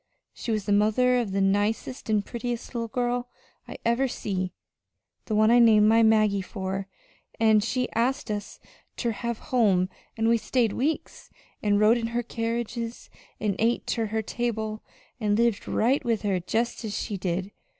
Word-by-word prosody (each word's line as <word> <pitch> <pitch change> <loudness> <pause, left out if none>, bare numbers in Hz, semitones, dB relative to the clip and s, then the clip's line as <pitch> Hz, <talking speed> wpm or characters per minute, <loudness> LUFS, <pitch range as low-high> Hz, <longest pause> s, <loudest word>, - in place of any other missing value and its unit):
She - - -7
was 215 -3 -1
the 205 - -1
mother 220 +5 +3
of 225 -5 -2
the 195 0 0
nicest 205 +6 0
an' 210 -2 +2
prettiest 240 +2 -5
little 230 -1 -2
girl 245 +1 -1 0.4
I - - -8
ever 235 +3 +2
see 185 -6 -3 0.7
the 215 - -2
one 215 +1 +5
I 240 - +6
named 215 -3 +6
my 225 +1 +5
Maggie 215 -3 +4
for. 190 0 -4 0.5
An' 220 -1 +5
she 250 +4 -1
asked 250 +1 0
us 205 -1 -5 0.4
ter 235 - 0
her 235 +2 -3
home 210 -8 +2 0.3
an' 225 0 +1
we 230 0 +4
stayed 230 -1 +1
weeks, 300 +5 -3 0.3
an' 205 -1 +2
rode 215 +3 +5
in 230 - -2
her 240 - 0
carriages, 230 0 -4 0.3
an' 205 -2 0
ate 230 +2 +1
ter 225 -2 -1
her 220 +1 -2
table, 220 -2 -3 0.4
an' 210 -3 +1
lived 230 -2 +1
right 255 +6 +2
with 230 -2 0
her 195 -3 +1
jest 235 +7 -2
as 210 -2 -3
she 205 - -3
did. 185 +1 -2
220 Hz, 170 wpm, -26 LUFS, 205-235 Hz, 0.7 s, I